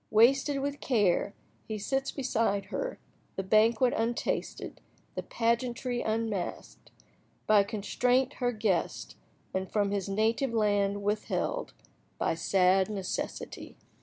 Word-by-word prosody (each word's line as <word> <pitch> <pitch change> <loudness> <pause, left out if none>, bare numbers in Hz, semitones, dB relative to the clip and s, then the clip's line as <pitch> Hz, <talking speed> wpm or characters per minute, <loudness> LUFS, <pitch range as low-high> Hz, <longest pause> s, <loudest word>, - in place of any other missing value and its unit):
"Wasted 270 +5 +4
with 285 +1 -3
care," 205 -5 +2 0.3
he 220 - -3
sits 270 +6 -1
beside 225 -7 0
her—the - - -6
banquet 220 +5 +4
untasted—the 230 +1 -3
pageantry 240 +1 -1
unmasked— 220 -4 -3 0.3
"... - - -38
By 210 -1 +7
constraint 245 +6 +1
Her 245 0 +2
guest, 215 -6 -1 0.4
and 190 0 -2
from 205 -2 +1
his 200 -1 -2
native 225 +5 +1
land 205 -2 +1
withheld 215 - -1 0.4
By - - +1
sad 185 +3 +3
necessity." 195 -3 -5
220 Hz, 105 wpm, -30 LUFS, 200-245 Hz, 0.4 s, By